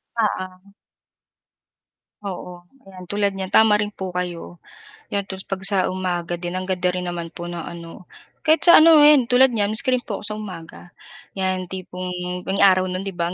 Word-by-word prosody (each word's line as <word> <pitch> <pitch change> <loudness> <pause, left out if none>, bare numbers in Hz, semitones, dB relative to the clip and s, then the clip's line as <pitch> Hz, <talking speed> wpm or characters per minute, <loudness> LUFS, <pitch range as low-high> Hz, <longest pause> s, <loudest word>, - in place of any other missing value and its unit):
Oo. 195 -3 -3 1.5
Oo, 180 -2 -8 0.2
ayan, 185 -1 -12
tulad 205 +2 0
niyan 190 0 -6
tama 220 -1 +5
rin 210 0 -3
po 190 -2 -6
kayo, 180 -1 -6 0.5
'yan 200 -1 -2
'tas 190 -1 -8
'pag 195 -1 -4
sa 195 -2 +1
umaga 175 -2 -3
din 175 0 -5
ang 185 - -3
ganda 185 -1 -2
rin 180 - -3
naman 170 -1 -5
po 175 0 -7
ng, 175 - -6
ano. 170 +2 -10 0.4
Kahit 315 +1 +4
sa, - - +9
ano, 315 -1 +7
ayan, 295 -4 +6
tulad 250 +2 +4
n'yan 215 -2 -1
miski 260 +4 +2
rin 255 -1 +1
po 205 - -5
ako - - -7
sa 210 - -4
umaga, 175 -3 -10 0.4
'yan 185 -1 -2
tipong 185 0 -7 0.4
may 195 +1 0
araw 185 -1 +5
no'n, 185 0 -4
'di 195 - -4
ba, 170 - 0
185 Hz, 185 wpm, -21 LUFS, 180-205 Hz, 1.5 s, sa